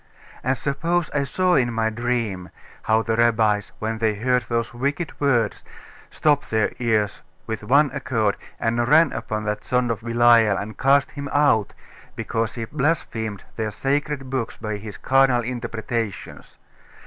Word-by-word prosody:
And 130 +1 +1
suppose 165 +5 -1
I 145 - +1
saw 185 +5 +1
in 125 -6 +3
my 110 -1 0
dream 115 -6 -2 0.3
how 110 0 +2
the 115 0 0
rabbis, 110 -3 +2
when 110 +1 -3
they 110 -2 +1
heard 125 +4 +1
those 115 -1 -1
wicked 140 +6 -2
words, 120 -7 +1 0.5
stopped 145 -2 +1
their 110 -1 +1
ears 110 -4 0 0.2
with 110 -1 -4
one 140 +6 +4
accord, 110 -5 0 0.2
and 115 +1 0
ran 160 +4 +5
upon 110 0 -3
that 105 0 -3
son 125 -1 +1
of 115 - -3
Belial 115 -3 +4
and 105 +2 -5
cast 140 +1 +3
him 140 -1 -6
out, 140 -8 +2 0.4
because 115 0 -2
he 115 -2 -4
blasphemed 115 - -2
their 110 -1 -1
sacred 135 +3 -2
books 130 -4 -3
by 110 -2 -4
his 105 -1 -9
carnal 130 -2 +3
interpretations. 115 -2 -5
115 Hz, 150 wpm, -23 LUFS, 110-135 Hz, 0.5 s, ran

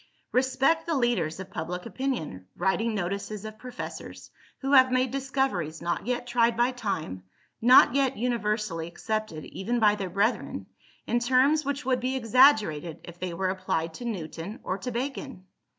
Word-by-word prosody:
Respect 270 +6 +2
the 330 - +1
leaders 210 - 0
of 190 0 -8
public 180 +2 -4
opinion, 230 - -4
writing 215 +5 0
notices 200 +2 -3
of 215 0 -8
professors, 250 -1 -8 0.3
who 270 0 -1
have 260 -1 +7
made 255 -1 +2
discoveries 265 - -1
not 170 +5 -3
yet 245 0 -1
tried 235 -1 +2
by 240 +2 +3
time, 180 - -4 0.4
not 245 +1 +7
yet 270 -1 +1
universally 210 -7 -1
accepted 215 -2 -4
even 235 +5 -2
by 210 -2 +5
their 195 -3 -4
brethren, 200 +6 0 0.4
in 240 - +1
terms 260 +5 +3
which 280 -1 -3
would 255 -1 +2
be 255 +2 -1
exaggerated 220 - +4
if 175 0 -11
they 185 -1 -3
were 190 +1 0
applied 185 -4 -2
to 240 - -8
Newton 185 -2 -5
or 185 +2 -3
to 250 - -4
Bacon. 260 -4 -5
225 Hz, 160 wpm, -27 LUFS, 185-255 Hz, 0.4 s, have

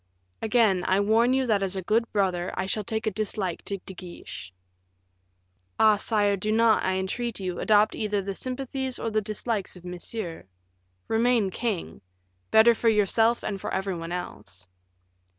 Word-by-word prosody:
"Again 215 -5 +3
I 190 +1 +3
warn 225 +4 +3
you 265 0 +2
that 215 -4 +2
as 195 0 -1
a 190 - -3
good 230 +5 +1
brother 185 -3 0
I 185 - 0
shall 210 +2 -2
take 220 0 -3
a 215 - +1
dislike 195 -3 -3
to 200 - -2
De 190 - -8
Guiche." 175 - -9 1.3
"Ah, 215 -1 +6
sire, 205 -1 +1
do 210 +3 -2
not, 225 0 +4
I 185 - +1
entreat 205 +5 -2
you, 180 -2 -3
adopt 215 0 +4
either 210 -2 -1
the 195 0 -3
sympathies 260 +2 -3
or 225 - -3
the 215 0 +1
dislikes 215 -1 -3
of 180 -1 -13
Monsieur. 180 0 -5 0.6
Remain 225 -3 +2
king; 215 -4 -3 0.5
better 225 +2 +7
for 230 0 +2
yourself 225 +2 +2
and 195 -2 -3
for - - -4
every 190 0 -1
one 165 0 -6
else." 105 - -7
210 Hz, 170 wpm, -26 LUFS, 190-225 Hz, 1.3 s, better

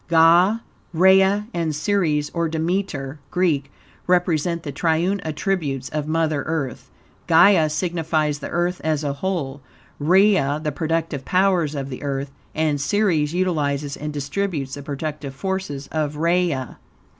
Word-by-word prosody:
Gai, 170 +5 +5 0.4
Rhea 190 +4 +5
and 165 -3 -1
Ceres, 155 -4 0
or 170 -1 0
Demeter 160 -4 -2
(Greek), 150 -6 0 0.4
represent 175 -2 +1
the 145 - -4
triune 170 +6 +1
attributes 155 -5 -2
of 150 -1 -3
Mother 155 -2 0
Earth. 150 -6 -3 0.4
Gai 165 0 +6
signifies 155 -2 -1
the - - -6
Earth 175 +1 -1
as 155 -1 0
a 140 -1 -1
whole, 140 -4 -3 0.4
Rhea 175 -3 +3
the 150 - -1
productive 160 -2 -2
powers 180 -4 +2
of 140 -1 -4
the 130 - -7
Earth, 140 -1 -3 0.2
and 150 -2 0
Ceres 170 -4 +1
utilizes 145 -6 0
and 150 0 -5
distributes 145 -1 -3
the 145 - -5
productive 145 -1 -5
forces 190 -5 -3
of 150 -2 -2
Rhea. 170 -5 0
160 Hz, 135 wpm, -22 LUFS, 145-180 Hz, 0.4 s, Gai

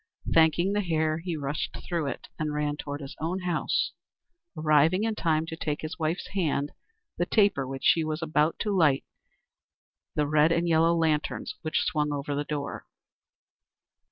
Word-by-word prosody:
Thanking 165 +4 +4
the 205 - +1
Hare, 160 -3 0
he 170 -1 -3
rushed 145 0 -3
through 170 -5 -1
it, 135 - -5
and 150 -1 -1
ran 150 0 0
toward 145 0 -6
his 140 +2 -8
own 175 +4 -2
house, 175 -3 0 0.7
arriving 155 +5 +3
in 225 0 +1
time 160 -6 +1
to 165 - -6
take 150 -2 -3
from - - -4
his 170 +3 -6
wife's 160 +3 -2
hand 150 -6 -1 0.5
the 175 - +1
taper 200 - +3
with 135 - -4
which - - -16
she 165 - +5
was 155 +1 -3
about 155 0 +1
to 210 -3 0
light 150 -7 +4 1.1
the 150 - +2
red 150 +2 +4
and 170 +1 +1
yellow 165 +1 +4
lanterns 155 -2 0
which 155 - 0
swung 150 -1 0
over 145 0 -3
the 145 +1 -1
door. 145 -1 -5
155 Hz, 175 wpm, -27 LUFS, 150-170 Hz, 1.1 s, she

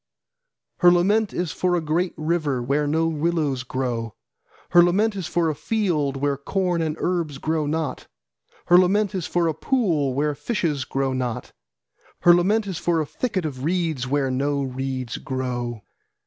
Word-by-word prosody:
Her 175 -2 +7
lament 200 +4 +2
is 175 -3 -2
for 180 -1 0
a - - +2
great 165 +3 -1
river, 155 -4 0
where 140 +4 0
no 160 +2 +1
willows 155 -4 0
grow, 120 -3 -3 0.6
Her 175 - +8
lament 205 +5 +2
is 185 -4 -4
for 170 -1 +1
a 155 - +1
field, 155 -9 -1
where 140 0 0
corn 180 +4 -1
and 155 -2 -1
herbs 170 -6 -1
grow 155 +1 -1
not. 155 -3 -3 0.6
Her 175 +1 +7
lament 195 +2 +2
is 185 -4 -3
for 175 -1 +1
a 160 - +1
pool, 160 - 0
where 150 +2 +1
fishes 150 - -2
grow 135 -1 -1
not. 125 -3 -3 0.7
Her 175 - +7
lament 205 +5 +2
is 190 -5 -4
for 170 -1 +1
a 155 - 0
thickest 190 - -2
of 135 -4 -5
reeds, 160 -6 -1
where 135 -1 0
no 140 +2 0
reeds 130 -2 -4
grow. 120 -4 -4
155 Hz, 165 wpm, -23 LUFS, 135-175 Hz, 0.7 s, Her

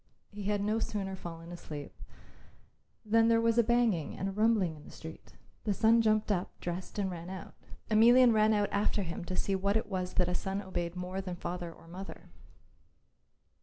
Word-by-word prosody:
He 205 -1 -7
had 205 0 +1
no 215 +2 +1
sooner 195 -3 -3
fallen 170 -2 -8
asleep 150 -4 -7 1.1
than 225 +1 +4
there 230 0 +4
was 230 0 +3
a - - +6
banging 230 -9 +1
and 195 - -2
a - - -2
rumbling 210 -5 +2
in 150 - -14
the - - -13
street. 160 0 -11 0.3
The 205 -2 0
son 230 +2 +5
jumped 215 -1 +2
up, 180 -2 0
dressed 175 +3 -5
and 195 -2 0
ran 170 0 -7
out. 190 -2 -8 0.3
Emelian 235 +3 +6
ran 215 0 +4
out 205 -1 +2
after 205 0 +1
him 170 -1 -5
to 185 - -3
see 195 - 0
what 200 +2 +1
it 220 - -1
was 185 -3 -3
that 180 -2 +3
a 180 - -1
son 190 +2 -2
obeyed 175 -3 -4
more 180 +1 -4
than 185 -2 -5
father 175 0 -5
or 165 - -17
mother. 185 +3 -9
195 Hz, 195 wpm, -31 LUFS, 180-215 Hz, 1.1 s, a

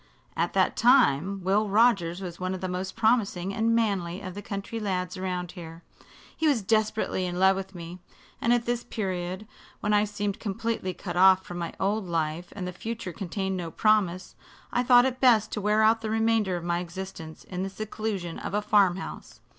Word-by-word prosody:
"At - - 0
that - - +2
time 190 - +3
Will 200 +3 +2
Rogers 195 -5 +3
was 175 -3 -7
one 185 +1 -2
of 185 - -8
the 185 - -2
most 185 +1 -4
promising 200 -5 +1
and 225 +2 +2
manly 195 -6 0
of 185 -2 -6
the 205 - -7
country 200 +3 -5
lads 185 -3 -2
around 180 -2 -3
here. 165 -2 -10 0.5
He 320 - +1
was 260 -8 +2
desperately 215 -3 0
in 175 0 -4
love 190 +1 +5
with 190 0 -6
me, 170 +1 -8 0.4
and 230 - +2
at 240 -1 +2
this 240 0 -1
period, 185 -2 -4 0.3
when 210 - 0
I 210 0 +4
seemed 205 +1 -3
completely 205 -2 -3
cut 175 -3 -6
off 190 0 +6
from 175 0 -6
my 170 - -4
old 200 0 0
life 165 0 -2
and 185 -3 -4
the 180 - -5
future 220 -1 -5
contained 190 +2 -3
no 170 -2 -4
promise, 190 -1 +1 0.4
I 245 - +2
thought 245 0 +6
it 260 -1 -1
best 235 -5 +5
to 210 - -3
wear 210 +2 +3
out 225 +1 +4
the 220 - -3
remainder 220 -4 +1
of 170 - -7
my 170 0 0
existence 175 -2 -8
in 180 -1 -5
the 195 - -2
seclusion 205 -4 -4
of - - -4
a 210 - +1
farm 200 -4 +4
house. 195 - -8
195 Hz, 200 wpm, -27 LUFS, 180-215 Hz, 0.5 s, off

